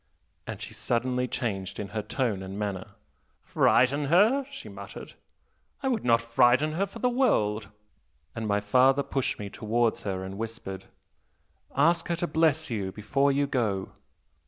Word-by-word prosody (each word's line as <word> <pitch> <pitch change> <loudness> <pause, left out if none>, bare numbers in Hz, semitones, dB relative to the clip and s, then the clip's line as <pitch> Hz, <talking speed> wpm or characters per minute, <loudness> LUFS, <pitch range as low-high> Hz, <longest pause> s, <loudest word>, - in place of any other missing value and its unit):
and - - -5
she - - -8
suddenly 125 +1 -1
changed 100 -6 -3
in 100 -2 -4
her 110 - -3
tone 110 -2 -1
and 95 +1 -7
manner. 100 -3 -4 0.5
'Frighten 140 +4 +3
her?' 215 - +4
she 275 -1 -9
muttered. - - -9 0.7
'I 265 - +1
would 240 -4 0
not 115 -1 +4
frighten 120 +5 +3
her 190 +6 0
for - - -11
the 250 - +1
world!' 110 - +1 0.6
And 115 -1 -4
my 105 0 +1
father 130 +6 +4
pushed 135 -2 -2
me 105 - -5
towards 115 +2 0
her 95 -2 -3
and 95 +2 -7
whispered 110 -4 -6 0.9
'Ask 165 +4 +3
her 170 - 0
to 170 - -2
bless 160 -2 +1
you 100 -4 -2
before 135 +8 +1
you 140 +1 +2
go.' 110 -8 -1
120 Hz, 155 wpm, -27 LUFS, 105-150 Hz, 0.9 s, her